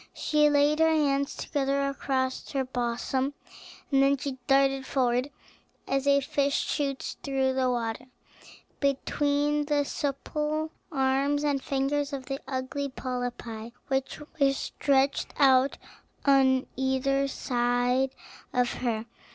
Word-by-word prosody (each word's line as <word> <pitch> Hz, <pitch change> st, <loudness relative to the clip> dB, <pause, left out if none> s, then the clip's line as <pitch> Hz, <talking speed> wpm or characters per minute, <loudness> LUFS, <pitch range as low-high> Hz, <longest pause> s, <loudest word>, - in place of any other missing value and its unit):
She 300 Hz, -1 st, +3 dB
laid 295 Hz, +1 st, +3 dB
her 320 Hz, 0 st, +5 dB
hands 280 Hz, -3 st, +1 dB
together 275 Hz, 0 st, 0 dB
across 260 Hz, -1 st, -2 dB
her 270 Hz, -1 st, 0 dB
bosom, 255 Hz, +2 st, -2 dB, 0.6 s
and 270 Hz, -1 st, +4 dB
then 275 Hz, +1 st, +4 dB
she 265 Hz, 0 st, -5 dB
darted 270 Hz, 0 st, +3 dB
forward 250 Hz, 0 st, +1 dB, 0.6 s
as 275 Hz, +1 st, 0 dB
a 280 Hz, 0 st, +5 dB
fish 280 Hz, +1 st, 0 dB
shoots 280 Hz, -3 st, -2 dB
through 265 Hz, -1 st, 0 dB
the 260 Hz, -1 st, +1 dB
water, 235 Hz, 0 st, -2 dB, 0.7 s
between 290 Hz, +1 st, +1 dB
the 290 Hz, -1 st, +2 dB
supple 300 Hz, +3 st, -2 dB, 0.2 s
arms 275 Hz, +1 st, +1 dB
and 285 Hz, -2 st, +1 dB
fingers 280 Hz, +2 st, -1 dB
of 265 Hz, -2 st, -4 dB
the 270 Hz, +1 st, -4 dB
ugly 270 Hz, +2 st, -3 dB
polypi, 245 Hz, -3 st, -5 dB, 0.2 s
which 265 Hz, -1 st, -1 dB, 0.2 s
were 275 Hz, -1 st, +4 dB
stretched 275 Hz, 0 st, 0 dB
out 270 Hz, -1 st, +4 dB, 0.5 s
on 265 Hz, -2 st, +4 dB
each 270 Hz, +1 st, +1 dB
side 245 Hz, +1 st, 0 dB, 0.4 s
of 250 Hz, -1 st, +1 dB
her. 230 Hz, -3 st, -1 dB
275 Hz, 120 wpm, -28 LUFS, 260-285 Hz, 0.7 s, her